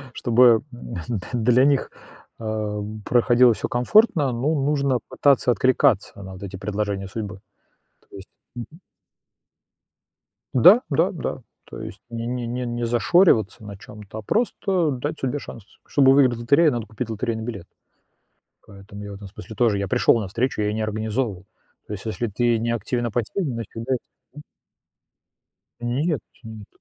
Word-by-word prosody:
Чтобы 120 Hz, -1 st, +5 dB
н 115 Hz, -2 st, -5 dB
д -, -, -11 dB
для 125 Hz, +2 st, +3 dB
них, 140 Hz, -1 st, +1 dB, 0.5 s
а, 110 Hz, -2 st, -3 dB, 0.2 s
проходило 120 Hz, 0 st, +4 dB
всё -, -, -4 dB
комфортно, 145 Hz, -, +3 dB
ну, 135 Hz, +7 st, 0 dB
нужно 140 Hz, -4 st, +1 dB
пытаться 140 Hz, -3 st, +3 dB
откликаться 110 Hz, -4 st, +2 dB
на 95 Hz, 0 st, -9 dB
вот 95 Hz, -, -10 dB
эти 95 Hz, -1 st, -7 dB
предложения 100 Hz, 0 st, -3 dB
судьбы. 105 Hz, -2 st, -6 dB, 0.7 s
То -, -, -11 dB
есть 95 Hz, 0 st, -11 dB, 0.3 s
Мгм. 130 Hz, +8 st, -9 dB, 1.7 s
Да, 185 Hz, -, +7 dB
да, 165 Hz, +6 st, +2 dB
да. 150 Hz, -6 st, -5 dB, 0.2 s
То -, -, -9 dB
есть -, -, -9 dB
не 115 Hz, 0 st, -5 dB
не 125 Hz, -1 st, -3 dB
не 125 Hz, +2 st, -3 dB
не 120 Hz, 0 st, -3 dB
зашориваться 120 Hz, -, +3 dB
на 100 Hz, -1 st, -8 dB
чём-то, 105 Hz, +2 st, -10 dB
а -, -, -7 dB
просто 190 Hz, -, 0 dB
дать 145 Hz, +4 st, -4 dB
судьбе 135 Hz, +2 st, -2 dB
шанс. 115 Hz, -, -10 dB, 0.2 s
Чтобы 135 Hz, -2 st, +5 dB
выиграть 130 Hz, -4 st, +4 dB
в -, -, -7 dB
лотерею, 140 Hz, +6 st, +4 dB
надо 120 Hz, -2 st, -3 dB
купить 110 Hz, +2 st, -6 dB
лотерейный 110 Hz, 0 st, -3 dB
билет. 100 Hz, -7 st, -6 dB, 1.0 s
Поэтому 100 Hz, +1 st, -11 dB
я 105 Hz, -, -7 dB
в -, -, -7 dB
этом 100 Hz, 0 st, -10 dB
смысле 110 Hz, +3 st, -11 dB
тоже. 110 Hz, -2 st, +2 dB
Я 100 Hz, 0 st, -2 dB
пришёл 115 Hz, -, +3 dB
на 105 Hz, -, -4 dB
встречу, 115 Hz, +3 st, -1 dB
я 105 Hz, -, 0 dB
её 105 Hz, -, -1 dB
не 110 Hz, -, -2 dB
организовывал. 110 Hz, -2 st, -2 dB, 0.4 s
То 105 Hz, -, -6 dB
есть, 95 Hz, -, -8 dB
если 115 Hz, +2 st, -2 dB
ты 115 Hz, +3 st, +1 dB
не 115 Hz, +1 st, -1 dB
активен, 120 Hz, +2 st, -2 dB
а 115 Hz, -, -2 dB
пассивен, 130 Hz, -, -2 dB
значит 115 Hz, -3 st, -7 dB
уже 125 Hz, +3 st, -1 dB, 0.4 s
М. 150 Hz, -, -9 dB, 1.4 s
Нет, 135 Hz, +7 st, -1 dB, 0.2 s
нет, 110 Hz, -2 st, -10 dB
120 Hz, 165 wpm, -23 LUFS, 105-130 Hz, 1.7 s, Да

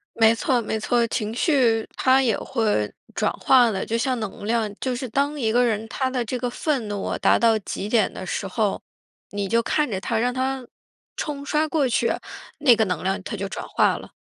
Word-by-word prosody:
没 225 Hz, 0 st, +5 dB
错 245 Hz, +2 st, +1 dB
没 220 Hz, 0 st, -2 dB
错， 235 Hz, +2 st, +2 dB
情 220 Hz, -2 st, -2 dB
绪 245 Hz, -6 st, +2 dB
它 265 Hz, +1 st, +4 dB
也 230 Hz, -5 st, +2 dB
会 210 Hz, -, 0 dB, 0.2 s
转 -, -, 0 dB
化 250 Hz, -3 st, +4 dB
的， 195 Hz, -3 st, -2 dB
就 230 Hz, -, -2 dB
像 250 Hz, 0 st, 0 dB
能 205 Hz, -1 st, -6 dB
量 225 Hz, -3 st, 0 dB
就 255 Hz, -2 st, -2 dB
是 255 Hz, +1 st, -4 dB
当 285 Hz, +4 st, 0 dB
一 225 Hz, -4 st, +1 dB
个 245 Hz, +2 st, +4 dB
人 220 Hz, -2 st, 0 dB
他 260 Hz, +3 st, -1 dB
的 250 Hz, -2 st, -2 dB
这 250 Hz, +3 st, -3 dB
个 245 Hz, 0 st, -1 dB
愤 255 Hz, -3 st, -1 dB
怒 205 Hz, -1 st, -4 dB
啊 -, -, -2 dB
达 -, -, +4 dB
到 225 Hz, -2 st, +4 dB
极 200 Hz, 0 st, -5 dB
点 220 Hz, -2 st, +2 dB
的 185 Hz, -, -7 dB
时 195 Hz, -, -3 dB
候， 205 Hz, +1 st, -1 dB, 0.5 s
你 200 Hz, -1 st, -3 dB
就 230 Hz, +4 st, +2 dB
看 300 Hz, +5 st, 0 dB
着 190 Hz, -4 st, -3 dB
它， 225 Hz, -, -1 dB
让 245 Hz, +2 st, +1 dB
它 260 Hz, 0 st, -2 dB, 0.5 s
冲 285 Hz, -2 st, -4 dB
刷 305 Hz, +1 st, +1 dB
过 300 Hz, -4 st, +1 dB
去， 240 Hz, -, +1 dB, 0.5 s
那 260 Hz, -5 st, +6 dB
个 220 Hz, -, +2 dB
能 180 Hz, -, -3 dB
量 190 Hz, +1 st, -1 dB
它 -, -, -5 dB
就 195 Hz, +1 st, -3 dB
转 195 Hz, -, -6 dB
化 -, -, +2 dB
了。 -, -, -11 dB
230 Hz, 235 characters per minute, -23 LUFS, 215-260 Hz, 0.5 s, 那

